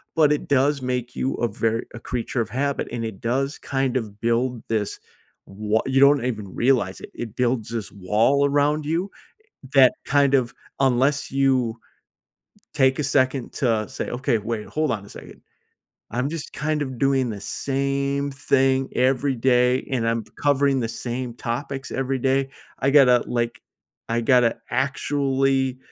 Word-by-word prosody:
but 155 Hz, -3 st, +4 dB
it 150 Hz, -, -3 dB
does 140 Hz, 0 st, +2 dB
make 125 Hz, -1 st, -3 dB
you 135 Hz, -, -1 dB
a 120 Hz, -, 0 dB
ver 115 Hz, +1 st, -1 dB
a -, -, -7 dB
creature 120 Hz, 0 st, -2 dB
of 110 Hz, -, -4 dB
habit, 140 Hz, +4 st, -1 dB
and 115 Hz, -1 st, -3 dB
it 110 Hz, -4 st, -7 dB
does 135 Hz, +4 st, -1 dB
kind 135 Hz, -2 st, -1 dB
of 105 Hz, -4 st, -6 dB
build 120 Hz, +1 st, 0 dB
this 110 Hz, -3 st, -1 dB, 0.5 s
wa 105 Hz, +2 st, -1 dB
you 135 Hz, 0 st, +2 dB
don't 140 Hz, -2 st, +5 dB
even 110 Hz, -5 st, -3 dB
realize 120 Hz, -7 st, +1 dB
it. -, -, -10 dB
It 115 Hz, -2 st, -7 dB
builds 120 Hz, -3 st, 0 dB
this 115 Hz, -3 st, -4 dB
wall 110 Hz, +9 st, +2 dB
around 145 Hz, +1 st, +1 dB
you, 170 Hz, +6 st, -1 dB, 0.6 s
eh, -, -, -10 dB
that 130 Hz, -2 st, +7 dB
kind 140 Hz, -1 st, +3 dB
of 125 Hz, -3 st, 0 dB, 0.3 s
unless 135 Hz, +2 st, +2 dB
you 130 Hz, -4 st, +1 dB, 1.0 s
take 130 Hz, 0 st, +3 dB
a -, -, -1 dB
second 130 Hz, -2 st, +1 dB
to 115 Hz, -6 st, 0 dB
say, -, -, -5 dB
"Okay. 125 Hz, 0 st, 0 dB
Wait. 110 Hz, 0 st, -4 dB
Hold 155 Hz, -2 st, -1 dB
on 100 Hz, -3 st, -4 dB
a -, -, -14 dB
second. -, -, -12 dB, 0.7 s
I'm 125 Hz, +4 st, -1 dB
just 160 Hz, -2 st, -5 dB
kind 150 Hz, 0 st, -1 dB
of 130 Hz, -3 st, -5 dB
doing 135 Hz, -2 st, +2 dB
the 105 Hz, -2 st, -6 dB
same 140 Hz, +4 st, -1 dB
thing 135 Hz, -1 st, +2 dB
every 130 Hz, +2 st, +2 dB
day, 125 Hz, +1 st, +2 dB
and 120 Hz, -4 st, 0 dB
I'm 115 Hz, -1 st, -1 dB, 0.2 s
covering 140 Hz, -1 st, +3 dB
the 115 Hz, -, -2 dB, 0.2 s
same 120 Hz, 0 st, -3 dB
topics 135 Hz, +3 st, -4 dB
every 135 Hz, 0 st, -1 dB
day. 135 Hz, +1 st, +1 dB, 0.3 s
I 135 Hz, -, +1 dB
gotta, 130 Hz, -4 st, +6 dB
like, 120 Hz, -2 st, -2 dB, 0.5 s
I 115 Hz, +1 st, 0 dB
gotta 125 Hz, -1 st, +4 dB
actually 135 Hz, 0 st, 0 dB
130 Hz, 165 wpm, -23 LUFS, 120-140 Hz, 1.0 s, that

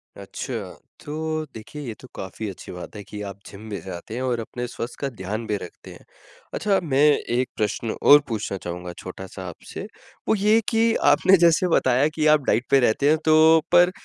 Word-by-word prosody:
अच्छा, -, -, -7 dB, 0.5 s
तो 155 Hz, +1 st, -3 dB
देखिए 110 Hz, +7 st, -9 dB
ये 115 Hz, -, -4 dB
तो 130 Hz, -, -12 dB
काफ़ी 95 Hz, +3 st, -6 dB
अच्छी 95 Hz, -, -10 dB
बात 90 Hz, +3 st, -9 dB
है 105 Hz, -, -7 dB
कि 105 Hz, +1 st, -8 dB
आप 100 Hz, -1 st, -7 dB
जिम 105 Hz, +2 st, -11 dB
भी 100 Hz, -2 st, -4 dB
जाते 95 Hz, +4 st, -8 dB
हैं 125 Hz, -, -3 dB
और 125 Hz, -2 st, -1 dB
अपने 120 Hz, +2 st, -5 dB
स्वस्थ 120 Hz, 0 st, -6 dB
का 140 Hz, -, -2 dB
ध्यान 110 Hz, 0 st, -5 dB
भी 105 Hz, -, 0 dB
रखते 90 Hz, -, -11 dB
हैं। -, -, -16 dB, 0.5 s
अच्छा 200 Hz, -2 st, +1 dB
मैं 140 Hz, -4 st, +1 dB, 0.3 s
एक 125 Hz, +1 st, +1 dB
प्रश्न 110 Hz, +1 st, -2 dB
और 145 Hz, -, +8 dB
पूछना 105 Hz, -4 st, -3 dB
चाहूँगा 90 Hz, 0 st, -6 dB
छोटा-सा 95 Hz, +1 st, -8 dB
आपसे 85 Hz, -, -9 dB, 0.4 s
वो -, -, +3 dB
ये 210 Hz, +2 st, +4 dB
कि 225 Hz, 0 st, +3 dB, 0.2 s
आपने 185 Hz, +6 st, +5 dB
जैसे 170 Hz, +1 st, +4 dB
बताया 130 Hz, +3 st, +3 dB
कि 155 Hz, -, 0 dB
आप 150 Hz, -2 st, +2 dB
डाइट 120 Hz, 0 st, +1 dB
पे 135 Hz, -, +6 dB
रहते 130 Hz, +3 st, +2 dB
हैं 155 Hz, -, +4 dB
तो 160 Hz, +1 st, +6 dB
पर 175 Hz, +1 st, +6 dB
125 Hz, 195 wpm, -23 LUFS, 105-155 Hz, 0.5 s, और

